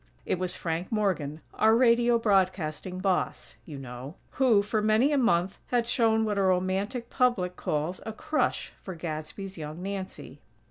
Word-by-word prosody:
It 180 Hz, -, -1 dB
was 185 Hz, -1 st, -2 dB
Frank 165 Hz, +2 st, -3 dB
Morgan, 170 Hz, -9 st, -1 dB
our 220 Hz, +1 st, +4 dB
radio 240 Hz, 0 st, +4 dB
broadcasting 185 Hz, -5 st, 0 dB
"boss", 190 Hz, -2 st, -1 dB
you 150 Hz, -4 st, -7 dB
know, 130 Hz, +3 st, -8 dB, 0.2 s
who, 235 Hz, -7 st, +4 dB
for 210 Hz, +1 st, 0 dB
many 215 Hz, +7 st, +3 dB
a 290 Hz, -, +3 dB
month, 185 Hz, -6 st, +2 dB
had 240 Hz, -2 st, +1 dB
shown 225 Hz, -2 st, +2 dB
what 210 Hz, -2 st, 0 dB
a -, -, +3 dB
romantic 190 Hz, +6 st, 0 dB
public 215 Hz, -9 st, +1 dB
calls 155 Hz, +4 st, -2 dB
"a 220 Hz, -, -4 dB
crush" 305 Hz, +7 st, -1 dB
for 190 Hz, -, -7 dB
Gadsby's 165 Hz, +4 st, -6 dB
young 155 Hz, +3 st, -6 dB
Nancy. 195 Hz, -1 st, -6 dB
190 Hz, 155 wpm, -28 LUFS, 175-225 Hz, 0.2 s, our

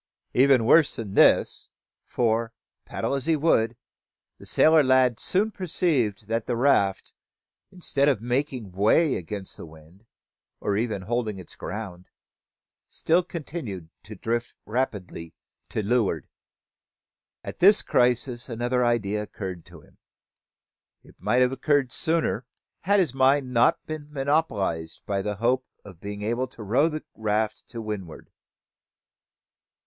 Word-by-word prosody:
Even 130 Hz, -2 st, +4 dB
worse 150 Hz, +4 st, +5 dB
than 105 Hz, -4 st, -6 dB
this; -, -, +4 dB, 0.4 s
for, 115 Hz, -1 st, 0 dB, 0.3 s
paddle -, -, -3 dB
as 140 Hz, 0 st, -2 dB
he 165 Hz, -, +4 dB
would, 120 Hz, -7 st, +2 dB, 0.6 s
the -, -, -11 dB
sailor 160 Hz, 0 st, +5 dB
lad 130 Hz, -3 st, +3 dB
soon 210 Hz, +4 st, +1 dB
perceived 145 Hz, -, -1 dB
that 115 Hz, 0 st, -2 dB
the 120 Hz, -, -1 dB
raft, 100 Hz, -7 st, +2 dB, 0.6 s
instead 145 Hz, -6 st, +1 dB
of 135 Hz, -, +1 dB
making 120 Hz, -2 st, -2 dB
way 110 Hz, -, +3 dB
against 95 Hz, +2 st, -6 dB
the -, -, -8 dB
wind, 80 Hz, +7 st, -18 dB, 0.5 s
or 100 Hz, -, -1 dB
even 105 Hz, -3 st, -2 dB
holding 110 Hz, -1 st, -2 dB
its 90 Hz, -4 st, -10 dB
ground, 90 Hz, -2 st, -7 dB, 0.8 s
still 170 Hz, +3 st, +2 dB
continued 150 Hz, -, -7 dB
to 105 Hz, +1 st, -10 dB
drift 115 Hz, +4 st, -3 dB
rapidly 100 Hz, -8 st, -3 dB, 0.3 s
to 110 Hz, -, -2 dB
leeward. 100 Hz, -, 0 dB, 1.2 s
At -, -, -8 dB
this 200 Hz, +3 st, +6 dB
crisis 125 Hz, 0 st, +1 dB
another 120 Hz, +2 st, 0 dB
idea 105 Hz, -3 st, 0 dB
occurred 95 Hz, -4 st, -7 dB
to 85 Hz, -3 st, -14 dB
him. -, -, -24 dB, 1.0 s
It -, -, -18 dB
might 125 Hz, -, +2 dB
have 125 Hz, -, +2 dB
occurred 140 Hz, -1 st, +1 dB
sooner, 160 Hz, -5 st, -1 dB, 0.3 s
had 200 Hz, +3 st, +2 dB
his 165 Hz, -9 st, +1 dB
mind 135 Hz, 0 st, +2 dB
not 120 Hz, 0 st, +3 dB
been 150 Hz, -1 st, -7 dB
monopolised 135 Hz, -, -1 dB
with 100 Hz, 0 st, -1 dB
the 105 Hz, 0 st, -2 dB
hope 125 Hz, +5 st, 0 dB, 0.2 s
of 95 Hz, -4 st, -13 dB
being 105 Hz, 0 st, -6 dB
able 120 Hz, +4 st, -1 dB
to 120 Hz, -3 st, -11 dB
row 130 Hz, +10 st, +2 dB
the 155 Hz, -1 st, -5 dB
raft 110 Hz, 0 st, -1 dB
to 115 Hz, -, -7 dB
windward. 105 Hz, -7 st, -7 dB
120 Hz, 135 wpm, -25 LUFS, 105-140 Hz, 1.2 s, this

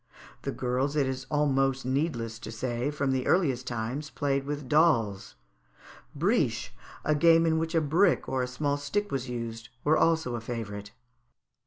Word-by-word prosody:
The -, -, -3 dB
girls, 130 Hz, +3 st, -1 dB
it 145 Hz, -2 st, +3 dB
is 130 Hz, 0 st, -4 dB
almost 135 Hz, -3 st, +1 dB
needless 130 Hz, -5 st, -1 dB
to -, -, -7 dB
say, 120 Hz, +3 st, -2 dB
from 140 Hz, -2 st, -1 dB
the 130 Hz, -1 st, -1 dB
earliest 135 Hz, -9 st, +2 dB
times 125 Hz, +6 st, -3 dB
played 140 Hz, -2 st, -1 dB
with 145 Hz, -1 st, -4 dB
dolls. 115 Hz, -, +2 dB, 0.8 s
Briche, 140 Hz, -, +1 dB, 0.3 s
a 155 Hz, -, +3 dB
game 165 Hz, +2 st, +5 dB
in 160 Hz, -1 st, +2 dB
which 165 Hz, +1 st, -2 dB
a 165 Hz, -, +4 dB
brick 170 Hz, +5 st, +3 dB
and 130 Hz, -, 0 dB
a 125 Hz, -, -1 dB
small 140 Hz, +3 st, -1 dB
stick 205 Hz, +9 st, -2 dB
was 130 Hz, -2 st, -2 dB
used, 115 Hz, -1 st, -5 dB
were 155 Hz, +2 st, +3 dB
also 160 Hz, -6 st, +2 dB
a 120 Hz, -, -3 dB
favourite. 105 Hz, -3 st, -5 dB
135 Hz, 165 wpm, -28 LUFS, 120-155 Hz, 0.8 s, game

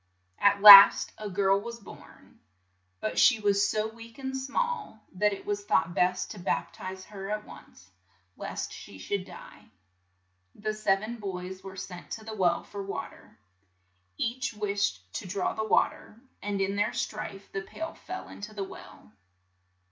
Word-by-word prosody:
At 200 Hz, 0 st, +3 dB
last 200 Hz, -1 st, +11 dB
a 210 Hz, -1 st, -5 dB
girl 195 Hz, +1 st, +2 dB
was 235 Hz, +1 st, -8 dB
born, 205 Hz, -, -15 dB, 0.6 s
but 215 Hz, -, -1 dB
she 245 Hz, -5 st, +6 dB
was 205 Hz, -1 st, +2 dB
so 215 Hz, 0 st, 0 dB
weak 230 Hz, 0 st, -13 dB
and 265 Hz, -1 st, -5 dB
small 280 Hz, -, -3 dB
that 210 Hz, +3 st, +2 dB
it 200 Hz, -, -7 dB
was 205 Hz, 0 st, -2 dB
thought 165 Hz, -3 st, +1 dB
best 180 Hz, +1 st, 0 dB
to 210 Hz, -, -9 dB
bap 170 Hz, 0 st, -2 dB
tize 190 Hz, 0 st, -8 dB
her 195 Hz, -1 st, -8 dB
at 210 Hz, 0 st, -3 dB
once, 90 Hz, +1 st, -15 dB, 0.4 s
lest -, -, -5 dB
she 95 Hz, -, -11 dB
should 185 Hz, -, -3 dB
die. 190 Hz, -, -13 dB, 0.9 s
The 215 Hz, +1 st, -3 dB
sev=en 215 Hz, +2 st, 0 dB
boys 190 Hz, -2 st, -6 dB
were 190 Hz, -1 st, -9 dB
sent 180 Hz, -1 st, -8 dB
to 220 Hz, -, -7 dB
the 220 Hz, -, -6 dB
well 185 Hz, -5 st, +1 dB
for 200 Hz, -, -8 dB
wa 195 Hz, 0 st, -5 dB
ter. -, -, -19 dB, 0.8 s
Each 240 Hz, -1 st, -2 dB
wished 200 Hz, -, -1 dB
to -, -, -7 dB
draw 190 Hz, +2 st, -1 dB
the 220 Hz, -, -3 dB
wa -, -, +4 dB
ter, 215 Hz, -, -16 dB, 0.2 s
and 205 Hz, -1 st, -3 dB
in 195 Hz, +1 st, 0 dB
their 205 Hz, +1 st, +1 dB
strife 205 Hz, -2 st, -5 dB
the 195 Hz, -, -3 dB
pail 325 Hz, +11 st, -7 dB
fell 370 Hz, +2 st, -8 dB
[in -, -, -12 dB
to 215 Hz, +1 st, -8 dB
the 200 Hz, -, -3 dB
well. 105 Hz, -, -12 dB
200 Hz, 170 wpm, -28 LUFS, 190-215 Hz, 0.9 s, last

